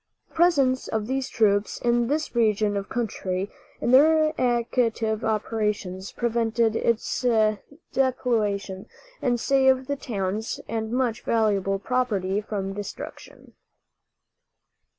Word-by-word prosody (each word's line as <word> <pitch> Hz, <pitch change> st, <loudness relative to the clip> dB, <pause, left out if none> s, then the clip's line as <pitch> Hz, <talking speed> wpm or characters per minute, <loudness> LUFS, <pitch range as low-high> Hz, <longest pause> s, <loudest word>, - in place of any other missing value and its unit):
The -, -, -28 dB
presence 280 Hz, -7 st, +3 dB
of 220 Hz, -1 st, -2 dB
these 265 Hz, +2 st, -2 dB
troops 205 Hz, -2 st, +1 dB
in 240 Hz, -1 st, +1 dB
this 300 Hz, +3 st, -1 dB
region 215 Hz, -3 st, +2 dB
of 200 Hz, 0 st, -3 dB
country, 200 Hz, -5 st, -3 dB, 0.3 s
and 240 Hz, -, 0 dB
their 310 Hz, +3 st, +5 dB
active 235 Hz, -2 st, 0 dB
operations, 210 Hz, -3 st, -2 dB
prevented 230 Hz, -1 st, 0 dB
its 230 Hz, 0 st, 0 dB, 0.7 s
depopulation, 215 Hz, -7 st, 0 dB, 0.3 s
and 245 Hz, -2 st, +1 dB
saved 265 Hz, 0 st, +3 dB
the 285 Hz, -, -1 dB
towns 215 Hz, -5 st, -3 dB
and 220 Hz, -1 st, -3 dB
much 245 Hz, -2 st, 0 dB
valuable 200 Hz, -3 st, +1 dB
property 205 Hz, -4 st, -1 dB
from 200 Hz, -2 st, -4 dB
destruction. 205 Hz, 0 st, -9 dB
225 Hz, 110 wpm, -25 LUFS, 205-255 Hz, 0.7 s, their